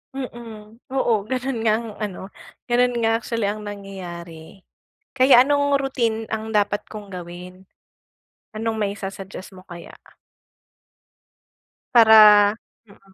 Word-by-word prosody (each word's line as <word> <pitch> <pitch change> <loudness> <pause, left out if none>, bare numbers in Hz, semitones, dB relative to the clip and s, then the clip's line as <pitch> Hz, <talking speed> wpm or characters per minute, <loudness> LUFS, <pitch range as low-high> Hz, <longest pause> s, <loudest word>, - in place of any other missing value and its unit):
Mm, 230 -4 -9
oo. 260 -3 +1
Ganun 260 -1 -2
nga 220 -1 +2
ang 230 0 -7
ano, 205 -4 -5 0.4
ganun 245 0 +2
nga 225 -1 +1
actually 230 -3 -3
ang 210 +1 -3
nangyayari. 185 -4 -10 0.5
Kaya 260 -1 +6
anong 285 0 +2
routine 235 -5 -2
ang 220 0 -4
dapat 205 0 +1
kong 205 -2 -10
gawin? 180 +1 -10 0.9
Anong 220 +1 -3
maisu-suggest 195 -2 -6
mo 185 - -13
kaya? 175 -1 -11 2.0
Para 215 -2 +7 0.3
mm. 195 -1 -22
215 Hz, 110 wpm, -22 LUFS, 195-235 Hz, 2.0 s, Para